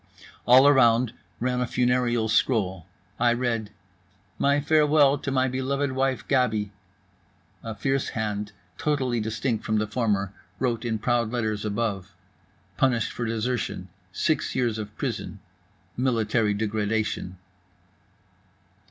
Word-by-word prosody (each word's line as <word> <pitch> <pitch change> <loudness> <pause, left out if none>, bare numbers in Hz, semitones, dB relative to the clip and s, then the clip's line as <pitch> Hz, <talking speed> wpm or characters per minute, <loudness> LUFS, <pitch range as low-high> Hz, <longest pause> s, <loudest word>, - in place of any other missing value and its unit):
All 130 +3 +8
around 120 -4 +4 0.3
ran 125 +1 0
a 125 - 0
funereal 125 -2 +1
scroll. 100 -6 +1 0.3
I 120 0 +4
read: 120 -3 -1 0.7
"My 140 +1 +3
farewell 145 -1 +4
to 140 - -4
my 130 -1 +2
beloved 135 +2 -1
wife, 130 -3 -1
Gaby." 110 -7 +1 0.9
A 110 -1 -6
fierce 135 +3 -1
hand, 105 -1 -2 0.3
totally 130 -5 0
distinct 110 +2 -2
from 110 - 0
the 105 - +1
former, 105 -3 -1 0.2
wrote 120 -2 -1
in 115 -2 0
proud 120 0 0
letters 110 -4 -2
above: 100 -3 -3 0.6
"Punished 120 -5 +1
for 120 - -4
desertion. 115 -4 -2 0.2
Six 155 - 0
years 120 -4 0
of 105 -1 -7
prison—military 115 -4 -2
degradation." 105 -3 -2
120 Hz, 115 wpm, -25 LUFS, 110-130 Hz, 0.9 s, All